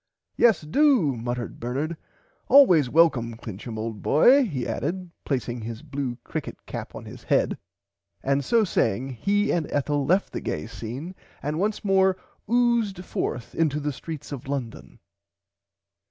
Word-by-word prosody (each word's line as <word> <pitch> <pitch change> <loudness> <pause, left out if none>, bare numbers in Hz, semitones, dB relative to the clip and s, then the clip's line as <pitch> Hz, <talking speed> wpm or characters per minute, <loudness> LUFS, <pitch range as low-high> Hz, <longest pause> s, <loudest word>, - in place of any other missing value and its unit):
Yes 230 -7 +4
do 175 - +3
muttered 120 +1 -4
Bernard 140 +8 -2 0.5
always 180 - +6
welcome 125 -7 +3
Clincham 110 0 -7
old 110 -1 -4
boy 255 - +5
he 140 - -3
added 180 0 -3
placing 125 -3 -2
his 115 0 -6
blue 135 -4 -4
crickit - - -5
cap - - -7
on - - -8
his - - -11
head - - +2 0.7
and 140 +1 +1
so 230 - +3
saying 135 - 0
he 200 - 0
and 165 -3 -1
Ethel 145 0 0
left 185 +8 +1
the - - -3
gay 75 - -3
scene 120 +10 -7 0.3
and 150 +3 -2
once 210 +2 -1
more 190 -1 +3 0.3
oozed 235 -6 +2
fourth 120 - -3
into 150 -3 +1
the 150 0 -2
streets 150 +2 -8
of 135 -2 -6
London. 115 - -5
145 Hz, 145 wpm, -25 LUFS, 120-190 Hz, 0.7 s, always